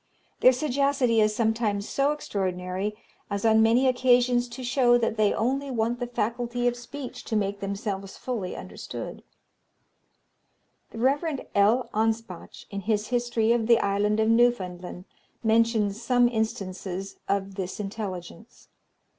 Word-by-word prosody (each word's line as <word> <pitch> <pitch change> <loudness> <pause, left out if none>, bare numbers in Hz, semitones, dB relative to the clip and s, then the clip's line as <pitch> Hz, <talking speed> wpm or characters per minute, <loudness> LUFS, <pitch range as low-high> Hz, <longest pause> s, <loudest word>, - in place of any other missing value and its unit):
Their 255 - +7
sagacity 265 -3 +1
is 215 0 +2
sometimes 220 -3 0
so 280 +1 +1
extraordinary, 190 -6 -3 0.3
as 200 +1 -2
on 220 0 +5
many 235 +4 +4
occasions 245 -1 +3
to 250 +2 -8
show 245 -1 +4
that 230 -2 0
they 215 -2 +3
only 270 +5 -1
want 235 -1 -1
the 245 - -2
faculty 240 +1 -1
of 245 - +1
speech 250 +2 -8
to 220 - -3
make 200 -1 0
themselves 195 0 -4
fully 220 -8 -4
understood. - - -7 1.7
The - - -11
Rev. 280 +4 +1
L. 215 +5 +3
Anspach, 220 -4 -2
in 200 - -3
his 210 +1 -1
history 240 -2 +1
of 235 -2 +1
the 235 -1 +6
Island 205 +1 +1
of 220 - +3
Newfoundland, 185 -7 +1 0.4
mentions 220 -2 +2
some 245 0 +3
instances 195 -4 -3
of 195 0 -1
this 190 0 -5
intelligence. 200 0 -7
225 Hz, 135 wpm, -26 LUFS, 200-245 Hz, 1.7 s, Their